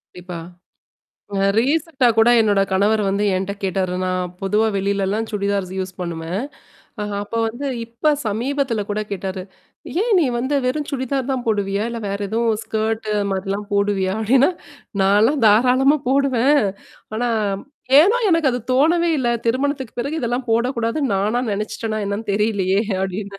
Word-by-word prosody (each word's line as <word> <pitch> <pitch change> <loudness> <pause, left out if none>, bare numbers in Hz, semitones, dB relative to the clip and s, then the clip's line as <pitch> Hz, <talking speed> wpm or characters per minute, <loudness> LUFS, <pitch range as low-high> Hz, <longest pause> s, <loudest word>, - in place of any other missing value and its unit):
கண்டிப்பா. 180 -1 -7 1.0
அ - - 0 0.2
ரீசென்ட்டா 275 +1 +1
கூட 225 +1 +5
என்னோட 205 -3 +3
கணவர் 205 +3 +2
வந்து 200 +2 0
என்கிட்ட 190 +2 -2
கேட்டாரு. 185 -1 -1
நான் 185 -1 -2
பொதுவா 210 +3 +2
வெளிலலாம் 200 +2 -1
சுடிதார்ஸ் 200 -2 -1
யூஸ் 185 0 -3
பண்ணுவேன். 170 +4 -3 0.6
அ - - -1 0.2
அப்ப 205 +3 -9
வந்து 240 +6 -5 0.2
இப்ப 235 +7 0
சமீபத்தில 240 +1 -1
கூட 210 - -1
கேட்டாரு. 190 -1 -4 0.6
ஏன் 475 - 0
நீ - - +3
வந்து 260 +4 -1
வெறும் 295 +3 -1
சுடிதார் 265 0 -2
தான் 255 -2 -3
போடுவியா? 205 -1 0
இல்ல 235 - -5
வேற 200 0 -2
எதுவும் 225 0 0
ஸ்கர்ட் 220 0 -2
அது 205 - +1
மாதிரிலாம் 195 +2 -3
போடுவியா? 200 -2 +1
அப்படின்னா, 260 - +4 0.5
நான்லாம் 215 +9 +3
தாராளமா 255 +7 +4
போடுவேன். 275 0 +3 0.5
ஆனா, 240 +2 0 0.7
ஏனோ 405 +9 +4
எனக்கு 330 -5 +3
அது 245 - -2
தோணவே 335 +6 +3
இல்ல. 245 - 0 0.2
திருமணத்துக்கு 265 0 -1
பிறகு 295 +6 -3
இதெல்லாம் 245 +1 -2
போடக்கூடாதுன்னு 235 +2 0
நானா 215 +5 +1
நினச்சிட்டேனா 215 +1 -3
என்னன்னு 205 +2 -3
தெரியலையே! 200 -2 +1 0.2
அப்படின்னு. 195 +1 -4
220 Hz, 140 wpm, -20 LUFS, 200-260 Hz, 1.0 s, கூட